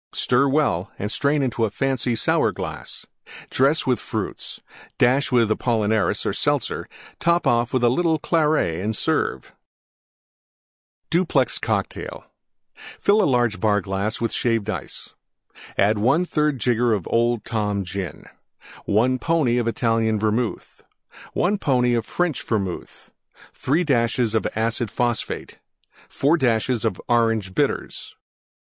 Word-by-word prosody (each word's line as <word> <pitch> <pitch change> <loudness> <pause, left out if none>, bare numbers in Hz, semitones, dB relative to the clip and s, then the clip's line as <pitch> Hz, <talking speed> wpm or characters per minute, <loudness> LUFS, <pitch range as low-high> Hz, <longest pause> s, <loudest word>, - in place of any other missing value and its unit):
Stir 130 +3 +2
well 135 - +1
and 105 +2 -3
strain 140 +3 +1
into 120 -3 -1
a 110 - +2
fancy 130 +1 -1
Sour - - +2
glass; - - -7 0.5
dress 140 +4 +2
with 125 -1 +1
Fruits; - - -5 0.4
dash 135 +4 +3
with 115 -3 +3
Apollinaris 110 -2 +1
or - - 0
Seltzer; - - -1 0.3
top 170 +1 +2
off 120 0 +2
with 130 -2 0
a 120 - +5
little 160 +5 +2
Claret 150 - +1
and 110 +1 -1
serve. - - -1 1.6
DUPLEX 165 -7 +2
COCKTAIL - - -3 0.8
Fill 210 +1 +3
large 120 -5 +1
Bar 105 -2 +2
glass 100 +2 -2
with 115 - -1
Shaved 115 -3 0
Ice. 90 - -7 0.6
1/3 140 - +2
Jigger 120 -2 +1
Old 120 -1 +1
Tom 105 -3 -1
Gin. 95 0 -6 0.6
1 125 +5 +2
pony 145 -6 +1
Italian 115 -2 +1
Vermouth. 110 +2 -2 0.5
1 200 +3 +1
pony 125 -6 +2
French 175 +4 -2
Vermouth. 100 -6 -4 0.4
3 155 +7 0
dashes 120 -5 +1 0.2
Acid 115 +1 -1
Phosphate. 120 +1 -2 0.5
4 150 +5 +2
dashes 120 -3 +1 0.2
Orange 115 -5 +1
Bitters. - - -2
120 Hz, 115 wpm, -22 LUFS, 110-135 Hz, 1.6 s, a